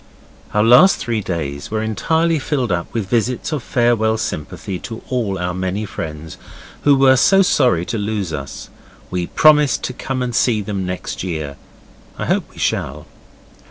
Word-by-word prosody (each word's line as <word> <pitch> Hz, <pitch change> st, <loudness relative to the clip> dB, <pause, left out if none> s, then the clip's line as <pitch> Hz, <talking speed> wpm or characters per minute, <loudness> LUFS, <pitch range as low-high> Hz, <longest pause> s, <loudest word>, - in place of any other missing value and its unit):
Our 105 Hz, -, +4 dB
last 125 Hz, -, +7 dB
three 115 Hz, -2 st, -2 dB
days 70 Hz, -7 st, -4 dB
were 110 Hz, 0 st, -2 dB
entirely 160 Hz, +9 st, +1 dB
filled 130 Hz, -6 st, -1 dB
up 85 Hz, -1 st, -2 dB
with 110 Hz, -5 st, -3 dB
visits 120 Hz, -, -1 dB
of 150 Hz, -4 st, -2 dB
farewell 115 Hz, -2 st, +1 dB
sympathy 95 Hz, -3 st, -4 dB
to 115 Hz, -1 st, -8 dB
all 115 Hz, -7 st, -1 dB
our 90 Hz, 0 st, -2 dB
many 95 Hz, +3 st, -2 dB
friends 80 Hz, -4 st, -7 dB, 0.5 s
who 145 Hz, -1 st, +6 dB
were 135 Hz, -1 st, +5 dB
so 195 Hz, +9 st, +5 dB
sorry 125 Hz, -, +2 dB
to 115 Hz, -, -3 dB
lose 100 Hz, -5 st, -2 dB
us. 70 Hz, -2 st, -6 dB, 0.4 s
We 90 Hz, -1 st, -2 dB
promised 150 Hz, -2 st, +4 dB
to 130 Hz, -, -3 dB
come 130 Hz, 0 st, -3 dB
and 125 Hz, -1 st, -3 dB
see 110 Hz, 0 st, +2 dB
them 95 Hz, -2 st, -3 dB
next 90 Hz, 0 st, -5 dB
year. 80 Hz, -6 st, -4 dB, 0.6 s
I -, -, -3 dB
hope -, -, 0 dB
we -, -, -21 dB
shall. 75 Hz, +4 st, -2 dB
110 Hz, 165 wpm, -19 LUFS, 90-125 Hz, 0.6 s, last